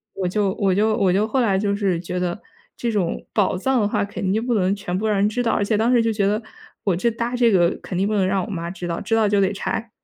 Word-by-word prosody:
我 185 - -1
就 195 +1 0
我 195 -2 +1
就 215 +3 +2
我 195 -5 +2
就 205 +3 +2
后 260 +4 +1
来 205 -5 +2
就 200 0 0
是， 195 -4 0
觉 180 +1 -5
得 180 +2 -2 0.3
这 235 - -2
种 195 -6 -1
宝 205 -4 +1
藏 260 +7 +1
的 205 - +2
话， - - 0
肯 200 -1 -2
定 220 +2 0
不 245 -1 0
能 190 -1 +2
全 185 -3 -4
部 210 - -2
让 210 -2 +1
人 200 +1 +3
知 245 +3 -2
道， 230 - +1
而 - - +1
且 210 +1 +1
当 230 +4 +2
时 240 - +5
就 225 0 +1
觉 205 -2 0
得， 210 +3 +1 0.4
我 195 -4 +1
这 235 +7 +1
搭 235 +2 -3
这 240 -2 +3
个 175 -3 +4
肯 185 - -5
定 195 +2 +1
不 215 - 0
能 195 -2 +2
让 190 -1 0
我 - - -7
妈 170 -3 -4
知 175 -1 -6
道， 170 - -2
知 225 - 0
道 220 -1 +3
就 205 0 +2
得 195 +1 +2
拆。 225 +3 -3
205 Hz, 325 characters per minute, -22 LUFS, 190-220 Hz, 0.4 s, 时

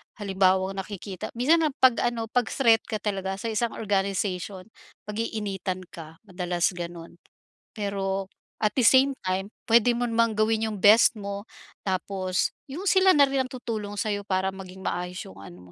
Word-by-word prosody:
halimbawang 190 -1 +1
nakikita 195 -1 -6
minsan 315 +6 +3
ang 275 - -6
'pag 255 -2 +6
ano, 230 -2 -1
pag-threat 235 -1 +3
ka - - -3
talaga 195 -2 -2
sa 225 +3 -4
isang 225 +1 -1
organization, 195 -2 -2 0.4
pag-iinitan 205 -4 -3
ka, 160 -1 -10
madalas 180 -3 -1
ganun. 170 -1 -8 0.6
Pero 195 -2 -2 0.3
at 215 -1 0
the 255 - +2
same 265 +3 +5
time 190 +1 -1 0.2
pwede 235 +1 +5
mo 245 - -1
namang 230 -2 +1
gawin 220 +1 +1
yung 210 -3 -6
best 220 +3 +7
mo 200 0 -6 0.4
tapos 185 0 -1 0.2
yung 300 +8 -6
sila 380 -1 +5
na 285 - +7
rin 270 -1 +1
ang - - -30
tutulong 220 -5 -5
sa'yo 205 -1 -2
para 190 0 0
maging 190 0 -10
maayos 180 0 -3
yung 95 - -12
ano 90 -2 -13
205 Hz, 155 wpm, -26 LUFS, 190-230 Hz, 0.6 s, best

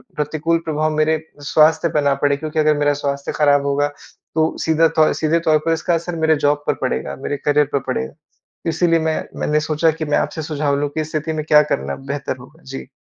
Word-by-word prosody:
प्रतिकूल 155 +2 0
प्रभाव 155 0 0
मेरे 155 +1 +2 0.3
स्वास्थ्य 160 +2 +4
पे 150 - +2
ना 140 -1 +3
पड़े 140 -1 +2
क्योंकि 155 +1 -3
अगर 155 -1 +3
मेरा 145 0 +2
स्वास्थ्य 140 -1 -3
खराब 145 -1 +3
होगा, 140 +1 +1 0.5
तो 160 0 +1
सीधा 160 0 +4
तौ 155 -1 +3
सीधे 160 +1 +1
तौर 160 -2 +3
पर 165 - +2
इसका 165 +2 -1
असर 170 +1 -3
मेरे 160 -1 +3
जॉब 145 0 +2
पर - - +3
पड़ेगा, 65 +2 -2
मेरे 145 - -4
करियर 150 0 +4
पर 140 - +2
पड़ेगा। 65 0 -2 0.6
इसीलिए 165 +1 +2
मैं 160 0 -1 0.2
मैंने 150 0 +1
सोचा 155 +1 +1
कि 160 0 -5
मैं 145 - +1
आपसे 160 - -2
सुझाव 145 -2 -1
लूँ 145 0 -1
कि 155 +2 -3
इस 155 - -5
स्थिति 155 +1 -2
में 155 -1 -3
क्या 150 -1 +6
करना 70 - -2
बेहतर 140 -1 -5
होगा? 150 +7 -16
जी। 135 -1 -8
155 Hz, 215 wpm, -19 LUFS, 145-160 Hz, 0.6 s, क्या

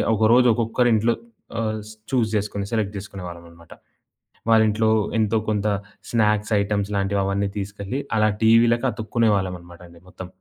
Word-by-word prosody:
ఒకరోజు 115 +4 +4
ఒక్కొక్కరింట్లో 115 -1 +2 0.5
ఆహ్, 110 -1 -1
స్ 110 - -10 0.2
చూస్ 120 -4 +1
చేసుకొని, 100 -1 -2
సెలెక్ట్ 105 -3 -1
జేసుకునే 100 -1 -8
వాళ్ళమనమాట. 85 -1 -13 0.8
వాళ్ళింట్లో, 110 0 +3 0.3
ఎంతో 110 0 +1
కొంత 105 -1 0 0.4
స్నాక్స్ 105 -2 +1
ఐటెమ్స్ 100 0 -1
లాంటివవన్నీ 100 0 0
తీసుకెళ్ళి, 100 +5 -4 0.2
అలా 110 -1 +3
టీవీ‌లకి 115 +2 +4
అతుక్కునే 115 0 0
వాళ్ళమనమాటండి 85 -2 -6
మొత్తం. 95 0 -9
105 Hz, 120 wpm, -22 LUFS, 100-115 Hz, 0.8 s, ఒకరోజు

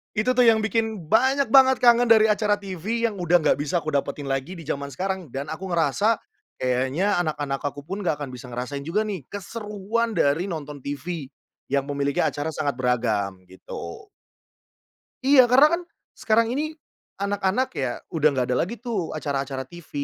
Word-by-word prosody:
Itu 220 +4 +2
tuh 250 -1 +4
yang 220 -1 +5
bikin 220 -6 -2
banyak 265 +2 +3
banget 265 -1 +7
kangen 240 0 +6
dari 220 -1 +6
acara 210 -1 +2
TV 205 +3 -4
yang 215 -5 0
udah 175 0 +2
nggak - - +3
bisa 155 +3 -1
kudapetin 145 -1 -2
lagi 135 +7 -2
di 165 - -9
jaman 140 -2 -3
sekarang. 185 +5 -3
Dan 140 +4 -5
aku 185 +5 -5
ngerasa 175 +6 +2 0.4
kayaknya 130 +10 0
anak-anak 145 -4 -2
akupun 145 +7 -5
nggak 175 -6 0
akan 135 - -6
bisa 125 0 -9
ngerasain 125 +4 -4
juga 205 +6 +1
nih, 195 -11 -5
keseruan 210 +2 -3
dari 155 +7 +2
nonton 150 -4 -6
TV 145 +2 -5 0.4
yang 140 0 +1
memiliki 140 0 -1
acara 145 +2 -1
sangat 145 -4 -2
beragam, 110 -7 0
gitu. 95 - -9 1.2
Iya. 260 -2 +7
Karena 260 +5 +7
kan - - -10 0.3
sekarang 230 +1 +2
ini 310 +4 -2 0.4
anak-anak 200 +4 0
ya 130 -3 -1 0.2
udah 155 -2 +4
enggak 130 -2 0
ada - - +2
lagi 220 +7 -6
tuh 220 -8 -3
acara-acara 140 -3 -3
TV 170 +4 -14
175 Hz, 165 wpm, -24 LUFS, 140-220 Hz, 1.2 s, banget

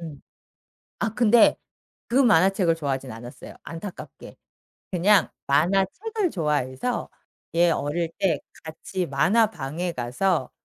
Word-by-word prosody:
음. 155 -5 -9 0.8
아 220 - -1
근데 235 0 +5 0.5
그 240 - -3
만화책을 190 -7 +4
좋아하진 135 -4 -3
않았어요 120 +2 -10
안타깝게. 170 +3 -9 0.6
그냥 190 +1 +3 0.2
만화책을 195 - +1
좋아해서 150 - -2 0.5
얘 170 0 +5
어릴 165 +2 -1
때 190 -3 +1 0.3
같이 170 +3 -5
만화방에 175 0 0
가서 130 +5 -1
170 Hz, 240 characters per minute, -24 LUFS, 145-200 Hz, 0.8 s, 근데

